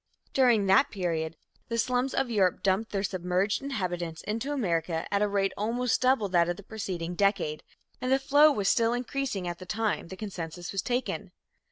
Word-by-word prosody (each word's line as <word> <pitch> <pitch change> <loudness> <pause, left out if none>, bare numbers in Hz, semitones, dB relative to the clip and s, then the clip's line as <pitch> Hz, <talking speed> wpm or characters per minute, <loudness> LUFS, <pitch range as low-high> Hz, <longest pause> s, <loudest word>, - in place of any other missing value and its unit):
During 240 -6 +4
that 195 +9 +5
period, 165 -5 -2 0.3
the 230 - -2
slums 250 +3 0
of 250 - 0
Europe 190 -5 +2
dumped 195 +3 +1
their 195 -1 -1
submerged 185 +1 0
inhabitants 175 -11 -3
into 225 +7 -3
America 170 - -1
at 200 - +2
a 210 - +3
rate 195 -1 0
almost 235 +4 0
double 255 -5 +3
that 175 -1 +3
of 175 - -2
the 205 - -11
preceding 185 -5 -4
decade, 190 -5 +1 0.4
and 255 - -1
the 265 - +6
flow 290 +3 +5
was 205 -8 -1
still 230 +2 +3
increasing 245 -6 -2
at 175 0 -4
the 185 - -10
time 215 -3 -1
the 190 - -9
census 175 0 -6
was 195 - -1
taken. 250 +4 -2
200 Hz, 185 wpm, -28 LUFS, 180-245 Hz, 0.4 s, the